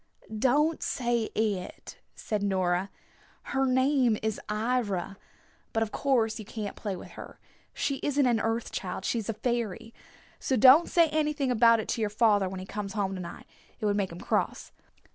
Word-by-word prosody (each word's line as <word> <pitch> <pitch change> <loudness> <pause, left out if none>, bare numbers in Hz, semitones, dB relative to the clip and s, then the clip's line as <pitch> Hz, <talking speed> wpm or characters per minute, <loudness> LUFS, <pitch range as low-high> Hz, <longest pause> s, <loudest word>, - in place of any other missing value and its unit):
"Don't 290 +8 +2
say 240 -2 0
'It,'" 205 -4 -3 0.2
said 210 -2 -3
Nora. 185 -1 0 0.5
"Her 270 0 0
name 260 -3 +3
is 220 -1 -1
'Ivra.' 210 -4 -1 0.6
But 225 - +2
of 215 - -5
course 240 -6 +1
you - - -6
can't 210 0 -6
play 205 -3 -4
with - - -10
her. - - -11 0.3
She 275 - -2
isn't 285 -1 +1
an 240 -3 +2
Earth 225 +1 -2
Child. 190 0 -4
She's 225 -3 -1
a - - 0
fairy. 230 -1 -3 0.5
So 265 - 0
don't 265 +8 +7
say 335 -2 +4
anything 300 -3 0
about 230 -1 +5
it 220 - -4
to 230 - -1
your 215 - +1
father 205 -3 +3
when 190 0 -6
he 185 - -7
comes 200 0 -5
home 200 -3 -1
to 185 - -5
night. 170 - -9 0.3
It - - -3
would 205 -1 +2
make 195 -3 -1
him 170 - -9
cross." - - -1
225 Hz, 180 wpm, -28 LUFS, 200-255 Hz, 0.6 s, don't